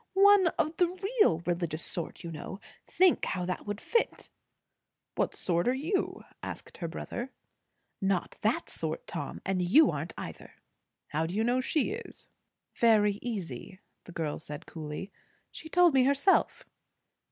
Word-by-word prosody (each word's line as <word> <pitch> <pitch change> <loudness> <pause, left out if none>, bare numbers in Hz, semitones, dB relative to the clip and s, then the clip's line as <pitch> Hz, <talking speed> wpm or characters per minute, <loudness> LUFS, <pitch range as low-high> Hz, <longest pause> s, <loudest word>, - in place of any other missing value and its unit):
One 400 -1 +7
of 310 +1 0
the 355 - +4 0.3
real 170 - +4
religious 170 -2 -1
sort, 170 +1 -5
you 170 - -5
know. 165 +5 -7 0.3
Think 370 -2 +4
how 180 -1 -1
that 180 +3 -4
would 205 0 -3
fit." 465 - -1 0.8
"What - - 0
sort 170 +1 0
are 250 - +3
you?" 330 +9 -1 0.2
asked - - -7
her 170 - -3
brother. 240 +9 -5 0.7
"Not 195 -1 0
that - - +1
sort, - - -4
Tom, - - -6
and 190 -1 0
you 220 - +6
aren't - - -5
either." - - -8 0.5
"How 160 +2 0
do 175 - -5
you 220 - +2
know 245 +2 +2
she 300 +6 0
is?" 465 +3 -8 0.5
"Very 210 -3 +4
easy," 190 - -4
said 190 +3 -24
the - - -10
girl 155 -3 -2 0.3
coolly. 155 +5 -6 0.4
"She 315 - -9
told 350 -1 +5
me 265 -1 +5
herself." 280 +8 +3
205 Hz, 150 wpm, -30 LUFS, -, 0.8 s, One